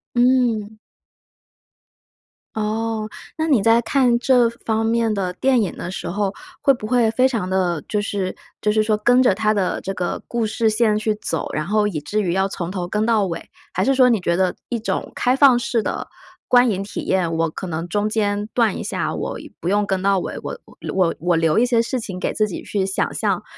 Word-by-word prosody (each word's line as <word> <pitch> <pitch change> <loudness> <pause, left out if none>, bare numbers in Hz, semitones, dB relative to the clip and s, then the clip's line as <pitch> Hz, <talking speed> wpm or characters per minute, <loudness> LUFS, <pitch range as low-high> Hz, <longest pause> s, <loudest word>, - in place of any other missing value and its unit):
嗯。 240 -4 +2 1.8
哦， 220 0 -2 0.3
那 315 - 0
你 270 -9 +4
在 225 +3 +4
看 245 0 +2
这 245 -1 +4
方 225 -1 -2
面 225 -1 +1
的 190 -3 -1
电 260 +3 +2
影 200 - -2
的 175 - -5
时 - - -5
候， 200 +1 -1 0.3
会 275 - +5
不 215 -4 -6
会 235 -2 +3
非 255 +3 +3
常 225 -8 -2
的 175 -5 0
就 210 -1 0
是 200 -3 -3 0.3
就 210 - +2
是 215 0 +3
说 215 0 +1
跟 245 +4 +4
着 225 -7 +4
它 215 0 +1
的 195 -3 0
这 195 - -4
个 180 -1 -3
故 235 -2 -1
事 220 +1 +1
线 215 -1 +2
去 215 0 0
走， - - -3
然 155 - -2
后 210 0 +2
以 165 -7 -3
至 215 +7 -2
于 175 -3 0
要 190 +1 +2
从 180 -2 -5
头 180 -3 -3
跟 210 +3 0
到 220 -3 +3
尾， 170 -3 -5 0.3
还 185 - 0
是 270 - +3
说 255 -1 +5
你 225 -4 +3
觉 170 -1 0
得 185 -1 +1
一 235 -2 -1
种 220 - -3
开 250 +1 +2
放 270 -3 +6
式 235 -2 -1
的 - - -3 0.4
观 245 -1 +5
影 195 0 -2
体 200 - -6
验， 180 -3 0
我 165 0 0
可 185 - -6
能 165 0 -4
中 210 +2 0
间 205 -1 0
断 230 -5 +3
一 - - -5
下， - - -2
我 - - -4 0.2
不 175 - -2
用 205 +1 +2
跟 190 -2 -1
到 195 0 +3
尾， - - -5
我 - - -6 0.4
我 180 -3 +2
我 175 0 +1
留 165 +4 +2
一 245 - +4
些 240 -2 +2
事 250 +2 -2
情 190 -5 -6
给 - - -2
自 215 - +1
己 190 - -6
去 195 -2 -1
想 190 - -1
象 - - -1
215 Hz, 235 characters per minute, -21 LUFS, 190-235 Hz, 1.8 s, 放